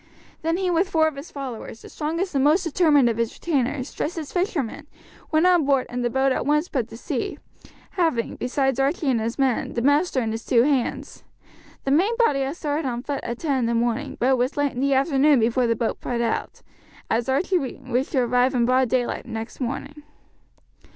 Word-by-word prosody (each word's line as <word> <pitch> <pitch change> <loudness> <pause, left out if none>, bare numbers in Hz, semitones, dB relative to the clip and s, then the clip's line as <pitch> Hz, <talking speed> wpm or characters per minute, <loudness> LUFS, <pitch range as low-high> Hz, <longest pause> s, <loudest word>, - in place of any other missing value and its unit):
Then 330 +2 0
he 370 -1 0
with 350 +3 +1
four 320 -3 +3
of 310 - -3
his 280 +4 -9
followers, 255 -5 -7
the - - -11
strongest 335 +5 -3
and 270 -1 +2
most 310 +6 +4
determined 305 -5 +3
of 230 -2 0
his 230 -1 -1
retainers, 275 -4 -1
dressed 330 +3 -3
as 310 -4 -5
fishermen, 315 - -2 0.4
went 315 +2 +3
on 355 -3 +5
board 275 -2 +2
and 245 0 -2
the 240 - +1
boat 265 +2 +2
at - - 0
once 300 +4 +1
put 250 -6 -1
to 225 - -9
sea, - - -3 0.5
having, 325 -11 0
besides 265 +1 0
Archie 280 +1 +1
and 230 -3 +1
his 230 +2 -3
men, 265 -4 0
the 235 - -1
master 285 +1 +3
and 225 -3 -1
his 225 +1 -4
two 235 -2 +3
hands. 270 -3 -1 0.6
The 270 - -1
main 370 +11 +3
body 460 - +3
had 270 +3 -2
started 295 -2 -2
on 240 -1 -3
foot 285 -1 -4
at 235 0 -4
ten 280 -3 0
in 240 - 0
the 235 - 0
morning, 240 +5 -1
but 250 - +2
it 265 - +4
was 250 +4 -1
late 290 -1 +1
in 245 - -6
the 275 +1 +2
afternoon 275 0 +4
before 240 +2 +2
the 230 - +2
boat 230 0 -2
put 240 -1 -2
out, 235 -1 -2 0.5
as 235 +3 0
Archie 355 +7 +2
wished 260 -1 -3
to 265 - +3
arrive 250 +2 +2
in 240 -1 +3
broad 255 0 +2
daylight 250 0 -1
next 225 +1 -6
morning. 275 +4 -4
270 Hz, 215 wpm, -23 LUFS, 245-300 Hz, 0.6 s, on